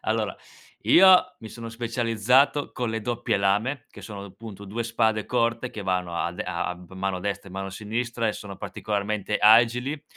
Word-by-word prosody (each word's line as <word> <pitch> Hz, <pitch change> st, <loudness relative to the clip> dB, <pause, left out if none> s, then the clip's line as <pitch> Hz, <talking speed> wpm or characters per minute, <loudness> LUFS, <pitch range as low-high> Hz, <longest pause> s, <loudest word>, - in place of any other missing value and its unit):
Allora 110 Hz, -1 st, -1 dB, 0.5 s
io 185 Hz, 0 st, +6 dB
mi 110 Hz, -, -10 dB
sono 115 Hz, 0 st, -8 dB
specializzato 120 Hz, +4 st, +1 dB
con 120 Hz, -2 st, -2 dB
le 115 Hz, -, -2 dB
doppie 120 Hz, -1 st, -1 dB
lame, 105 Hz, +7 st, 0 dB
che -, -, -13 dB
sono 100 Hz, -2 st, -8 dB
appunto 100 Hz, +1 st, -10 dB
2 110 Hz, +4 st, -4 dB
spade 110 Hz, -2 st, 0 dB
corte 120 Hz, 0 st, 0 dB
che 105 Hz, -, -7 dB
vanno 90 Hz, -2 st, -1 dB
a 85 Hz, +1 st, -1 dB
de 90 Hz, -, -4 dB
a 85 Hz, 0 st, -3 dB
a -, -, -4 dB
m 90 Hz, 0 st, -14 dB
mano 95 Hz, -1 st, -2 dB
destra 100 Hz, 0 st, -4 dB
e 95 Hz, -, -13 dB
mano 95 Hz, 0 st, -5 dB
sinistra 115 Hz, +3 st, -3 dB
e 105 Hz, -, +1 dB
sono 100 Hz, -2 st, -8 dB
particolarmente 105 Hz, 0 st, -2 dB
agili. 120 Hz, +7 st, +4 dB
110 Hz, 185 wpm, -25 LUFS, 100-120 Hz, 0.5 s, io